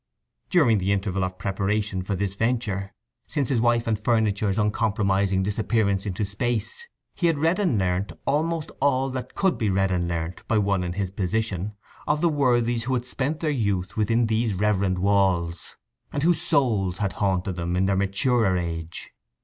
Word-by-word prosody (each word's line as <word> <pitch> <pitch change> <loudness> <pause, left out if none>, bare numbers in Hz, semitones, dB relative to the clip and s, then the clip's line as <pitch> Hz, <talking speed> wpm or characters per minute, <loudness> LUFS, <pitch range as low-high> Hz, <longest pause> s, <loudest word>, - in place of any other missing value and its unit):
During 125 - +4
the 95 +2 0
interval 95 -1 0
of 95 0 -3
preparation 100 +1 -1
for 100 +2 -2
this 95 0 -2
venture, 105 -3 -1 0.4
since 145 -5 -1
his 120 -4 +1
wife 120 -1 +2
and 110 -2 0
furniture's 105 -3 +1
uncompromising 100 -3 +1
disappearance 105 -1 0
into 100 +2 -2
space, 120 - -2 0.3
he 175 - +1
had 165 -3 +2
read 165 +6 +2
and 175 - +2
learnt 95 +1 0
almost 155 +2 0
all 135 -1 +2
that 130 -1 -6
could 190 -2 +1
be 110 -4 +1
read 95 0 +1
and 90 -1 0
learnt 85 +1 -4
by 110 - +2
one 100 -3 +1
in 90 0 -3
his 95 -1 -2
position, 100 0 -2 0.3
of 150 +1 +2
the 170 +1 +3
worthies 120 -5 +1
who 130 +1 0
had 120 -1 -2
spent 140 +4 -2
their 155 -2 +1
youth 100 -8 -1
within 115 +2 +2
these 110 -1 0
reverend 100 -2 +1
walls, 90 -4 +1 0.4
and 140 - -2
whose 170 0 +3
souls 110 - +1
had 100 -2 -1
haunted 95 -2 0
them 85 0 -2
in 95 +1 +2
their 95 0 +2
maturer 100 +1 +2
age. 85 -1 -5
105 Hz, 175 wpm, -25 LUFS, 95-120 Hz, 0.4 s, During